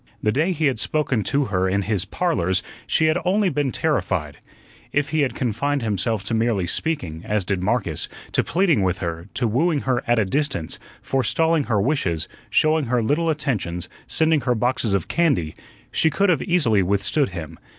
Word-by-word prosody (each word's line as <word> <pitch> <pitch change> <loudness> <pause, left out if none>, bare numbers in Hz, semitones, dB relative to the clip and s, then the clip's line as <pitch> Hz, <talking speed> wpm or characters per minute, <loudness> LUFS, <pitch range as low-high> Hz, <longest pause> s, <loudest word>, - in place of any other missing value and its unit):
The 105 - +3
day 155 - +1
he 160 -3 0
had 130 -6 +1
spoken 145 -6 +1
to 140 +7 +1
her 95 -4 0
in 100 +1 0
his 100 -2 -1
"Parlors" 95 - 0 0.2
she 160 - +2
had 155 +2 +2
only 195 +2 +2
been 145 -5 -1
terrified. 90 - -1 0.5
If 145 0 0
he 155 - 0
had 140 - 0
confined 130 +3 -1
himself 110 0 0
to 115 - -4
merely 110 -4 +1
speaking, 85 - -2
as 105 -3 -1
did 95 -1 -1
Marcus, 95 -6 -1 0.2
to - - +2
pleading 170 - +2
with 95 -1 +1
her, 85 0 -5
to 125 -2 +1
wooing 145 +7 +1
her 130 -2 0
at 120 0 +3
a 110 - +2
distance, 115 - -1 0.2
forestalling 150 +4 +1
her 110 -4 +1
wishes, 95 - 0 0.2
showing 155 -1 +3
her 120 -1 +1
little 160 +8 +1
attentions, 100 - -2 0.2
sending 160 -2 +3
her 125 -1 +1
boxes 120 -2 0
of 95 - -2
candy, 140 - +1 0.4
she 160 - +3
could 200 +6 +1
have 165 -7 +2
easily 125 - +2
withstood 100 - +1
him. 85 -3 -8
120 Hz, 180 wpm, -22 LUFS, 95-155 Hz, 0.5 s, The